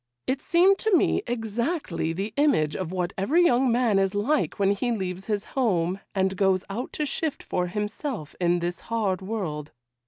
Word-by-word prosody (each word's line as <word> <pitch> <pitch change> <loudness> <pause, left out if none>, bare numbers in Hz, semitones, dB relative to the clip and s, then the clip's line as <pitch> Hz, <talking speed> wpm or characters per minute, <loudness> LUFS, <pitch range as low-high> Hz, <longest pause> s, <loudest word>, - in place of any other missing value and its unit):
It 265 +1 -1
seemed 370 +4 +4
to 435 -5 +3
me - - +2
exactly 235 - -2
the 195 +6 -4
image 275 - +2
of 180 -3 -3
what 180 0 -2
every 320 - +3
young 255 -3 +4
man 230 -4 +3
is 195 +1 +1
like 265 +9 +1
when 200 -1 +3
he 240 +5 0
leaves 190 -3 -3
his 210 -2 -1
home, 190 -8 +1 0.2
and 190 0 +1
goes 190 -2 +2
out 240 +6 -4
to 300 - -1
shift 300 +1 -2
for 180 0 -1
himself 210 - -4
in 175 0 +3
this 175 +1 -2
hard 205 -5 0
world. 180 -8 -4
205 Hz, 180 wpm, -26 LUFS, 185-255 Hz, 0.2 s, seemed